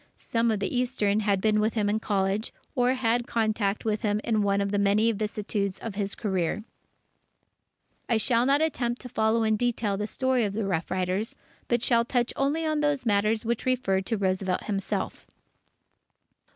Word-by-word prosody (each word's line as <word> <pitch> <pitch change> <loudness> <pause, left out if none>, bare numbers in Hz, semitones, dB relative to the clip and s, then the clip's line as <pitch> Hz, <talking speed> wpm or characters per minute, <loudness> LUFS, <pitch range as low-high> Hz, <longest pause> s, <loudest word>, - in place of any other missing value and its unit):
Some 230 0 0
of 215 -2 +1
the 200 - -2
eastern 245 -5 +1
had 205 -2 +1
been 215 0 +3
with 215 +2 +1
him 210 -2 +1
in 210 +1 +1
college, 200 0 -1 0.2
or 250 -1 +2
had - - -6
had 240 0 0
contact 215 -3 0
with 215 -1 0
him 210 -2 +1
in 220 -2 +1
one 200 -1 +2
of 200 0 -1
the 205 - +1
many 205 +3 +3
vicissitudes 205 -2 -2
of 225 +1 -6
his 200 0 -3
career. 190 -1 -1 1.5
I 230 - +3
shall 235 +2 +2
not 285 +3 +4
attempt 245 -6 -1
to 250 - -7
follow 225 0 +1
in 220 -1 +2
detail 225 -4 0
the 210 +1 -2
story 260 +1 +1
of 200 -2 -1
the 215 0 -2
Rough 165 -4 -1
Riders, 185 +3 -1 0.3
but 240 -1 +1
shall 235 -2 +4
touch 240 0 0
only 290 +4 0
on 310 -1 0
those 290 -3 0
matters 215 +1 +2
which 235 +2 -1
refer 240 -7 +1
to 225 +4 -2
Roosevelt 185 -1 0
himself. 200 -2 -3
215 Hz, 185 wpm, -27 LUFS, 200-240 Hz, 1.5 s, not